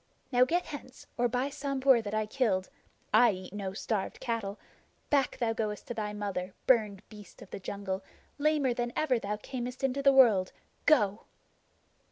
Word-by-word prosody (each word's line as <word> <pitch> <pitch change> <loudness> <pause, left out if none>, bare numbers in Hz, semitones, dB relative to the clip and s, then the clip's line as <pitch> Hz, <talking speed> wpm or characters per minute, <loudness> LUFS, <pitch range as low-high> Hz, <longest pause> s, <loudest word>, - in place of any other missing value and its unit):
Now 250 0 +5
get 350 +6 0
hence, 265 -3 -9
or 245 0 +2
by 250 +3 -1
the - - -14
Sambhur 275 -3 +2
that 210 -1 -4
I 215 0 +1
killed 210 -5 0 0.4
(I 240 -3 +6
eat 185 0 -9
no 195 -2 -4
starved 210 -1 -3
cattle), 225 -5 -3 0.5
back 275 -3 +2
thou 230 -2 0
goest 210 -2 -3
to - - -2
thy 215 -2 -3
mother, 200 -3 -4
burned 215 -6 +2
beast 210 -4 -13
of - - -17
the - - -5
jungle, 190 0 -4 0.4
lamer 290 -4 +2
than 240 0 -3
ever 265 -6 +2
thou 210 0 -3
camest 250 +3 -6
into 270 +1 +1
the 275 0 +6
world! 225 -9 +5 0.3
Go!" 215 -9 +3
230 Hz, 175 wpm, -30 LUFS, 205-260 Hz, 0.5 s, I